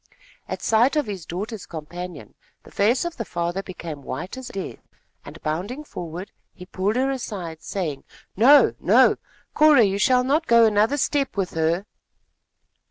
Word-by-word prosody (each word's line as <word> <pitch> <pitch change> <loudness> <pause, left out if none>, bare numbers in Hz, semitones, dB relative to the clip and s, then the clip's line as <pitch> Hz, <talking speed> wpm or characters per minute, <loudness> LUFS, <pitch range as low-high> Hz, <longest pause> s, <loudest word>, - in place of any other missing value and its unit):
At - - -5
sight 235 +6 +3
of 300 -2 +1
his 195 -6 -7
daughter's 205 +4 -5
companion, 170 - -8 0.3
the - - -16
face 230 +10 +2
of 345 -1 -5
the 230 - -2
father 175 -1 -3
became 170 -6 -8
white 175 - -6
as 260 -1 -8
death, 195 -1 -6 0.4
and, - - -11
bounding 190 - -3
forward, 175 - -7 0.2
he 180 - -11
pulled 190 +4 -1
her 265 +2 +1
aside, 190 -11 -5
saying: 165 -8 -4 0.3
"No, 270 +8 +6
no! - - +5 0.4
Cora, 300 -5 +6
you 200 -1 +1
shall 250 +4 +4
not 290 +5 +1
go 235 -1 +6
another 215 +5 +2
step 280 -4 0
with 190 -2 -1
her!" 165 +4 0
200 Hz, 160 wpm, -23 LUFS, 175-250 Hz, 0.4 s, No